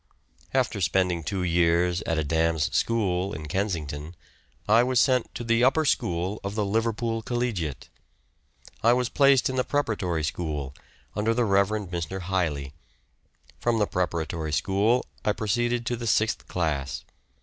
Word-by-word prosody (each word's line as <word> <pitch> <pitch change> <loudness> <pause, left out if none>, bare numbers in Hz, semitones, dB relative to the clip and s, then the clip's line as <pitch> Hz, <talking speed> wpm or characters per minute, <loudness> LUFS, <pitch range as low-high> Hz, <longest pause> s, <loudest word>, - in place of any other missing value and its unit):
After 125 -6 0
spending 90 -2 +1
two 95 +2 -2
years 85 +1 +2
at 80 - 0
a 80 - +1
dame's 80 0 +1
school 100 -4 0
at 75 -1 -7
Kensington, 80 -4 -3 0.5
I 110 +3 +6
was 125 0 +2
sent 130 -2 +2
to 120 - -4
the 115 +1 +2
upper 145 +5 +4
school 90 -5 0
of 100 +1 -4
the 105 -2 0
Liverpool 115 +2 0
Collegiate. 110 - -2 0.9
I 115 +2 +5
was 125 -1 0
placed 140 -2 +4
in 130 - -3
the 125 - +3
preparatory 100 - -1
school, 75 -4 -3 0.4
under 110 +2 +1
the 120 0 +2
Rev. 100 -1 +3 0.2
Mr. 85 +2 -3
Hiley. 80 -7 -1 0.9
From 120 -1 +1
the 105 - +3
preparatory 85 -4 -2
school 100 - +2 0.2
I 105 - +2
proceeded 120 +3 0
to 120 - -1
the 120 0 -5
sixth 110 +1 +1
class. 70 -6 -2
100 Hz, 150 wpm, -26 LUFS, 85-115 Hz, 0.9 s, I